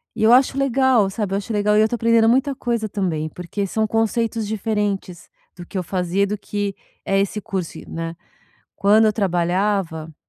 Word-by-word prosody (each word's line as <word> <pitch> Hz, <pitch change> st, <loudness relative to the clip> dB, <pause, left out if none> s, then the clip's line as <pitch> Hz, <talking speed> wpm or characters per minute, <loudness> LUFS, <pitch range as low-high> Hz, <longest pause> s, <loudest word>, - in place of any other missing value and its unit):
E -, -, -2 dB
eu 230 Hz, +2 st, +6 dB
acho 265 Hz, +1 st, +4 dB
legal, 260 Hz, -6 st, +3 dB
sabe, 195 Hz, -1 st, -3 dB
eu -, -, +1 dB
acho 210 Hz, +2 st, -5 dB
legal 210 Hz, 0 st, +2 dB
e -, -, +6 dB
eu 220 Hz, -, +4 dB
tô 240 Hz, -, -2 dB
aprendendo 230 Hz, 0 st, +3 dB
muita 265 Hz, +3 st, +2 dB
coisa 235 Hz, -4 st, -2 dB
também, 165 Hz, -6 st, -2 dB
porque 185 Hz, +4 st, -4 dB
são 220 Hz, +3 st, 0 dB
conceitos 225 Hz, 0 st, 0 dB
diferentes 205 Hz, -4 st, -3 dB, 0.3 s
do 175 Hz, -1 st, -10 dB
que 190 Hz, -, -7 dB
eu 180 Hz, -, -1 dB
fazia, 185 Hz, +2 st, 0 dB
do 210 Hz, +1 st, -3 dB
que 205 Hz, -1 st, -3 dB, 0.3 s
é 195 Hz, 0 st, +2 dB
esse 200 Hz, +2 st, -1 dB
curso, 190 Hz, -4 st, -5 dB
e -, -, -12 dB
né. 165 Hz, 0 st, -5 dB, 0.6 s
Quando 215 Hz, +2 st, +4 dB
eu 215 Hz, -, +3 dB
trabalhava 180 Hz, -4 st, -1 dB
205 Hz, 195 wpm, -21 LUFS, 185-225 Hz, 0.6 s, eu